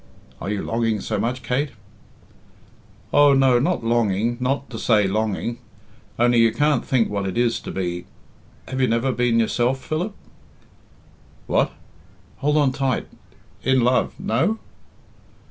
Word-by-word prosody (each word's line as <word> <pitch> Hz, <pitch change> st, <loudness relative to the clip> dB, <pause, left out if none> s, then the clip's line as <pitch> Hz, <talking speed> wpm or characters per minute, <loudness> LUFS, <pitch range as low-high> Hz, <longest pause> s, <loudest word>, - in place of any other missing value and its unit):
"Are -, -, -4 dB
you 105 Hz, -1 st, -2 dB
longing 115 Hz, -2 st, 0 dB
so -, -, -3 dB
much, 125 Hz, +2 st, -2 dB
Kate?" 130 Hz, +4 st, -1 dB, 1.4 s
"Oh, 145 Hz, -1 st, +6 dB
no, 135 Hz, -2 st, +4 dB
not 170 Hz, +1 st, 0 dB
longing 115 Hz, -1 st, +1 dB
not 135 Hz, +2 st, -1 dB
to 110 Hz, -, -6 dB
say 105 Hz, -3 st, +3 dB
longing. 110 Hz, +3 st, -2 dB, 0.6 s
Only 120 Hz, 0 st, +4 dB
you 115 Hz, -1 st, +5 dB
can't 145 Hz, +2 st, +1 dB
think 125 Hz, -4 st, +2 dB
what 100 Hz, -1 st, -2 dB
it 95 Hz, -, -4 dB
is 120 Hz, -1 st, +1 dB
to -, -, -7 dB
be... 90 Hz, -2 st, -3 dB, 0.6 s
have 130 Hz, 0 st, -3 dB
you 130 Hz, -, +4 dB
never 115 Hz, +3 st, +1 dB
been 120 Hz, -2 st, +1 dB
yourself, 120 Hz, +3 st, +1 dB
Philip?" 180 Hz, +7 st, -2 dB, 1.3 s
"What?" -, -, +1 dB, 0.6 s
"Hold 150 Hz, 0 st, +2 dB
it -, -, -5 dB
tight... 135 Hz, -3 st, 0 dB, 0.5 s
in 130 Hz, 0 st, +2 dB
love? 125 Hz, +1 st, +2 dB
No?" 205 Hz, +3 st, 0 dB
120 Hz, 140 wpm, -22 LUFS, 115-135 Hz, 1.4 s, Oh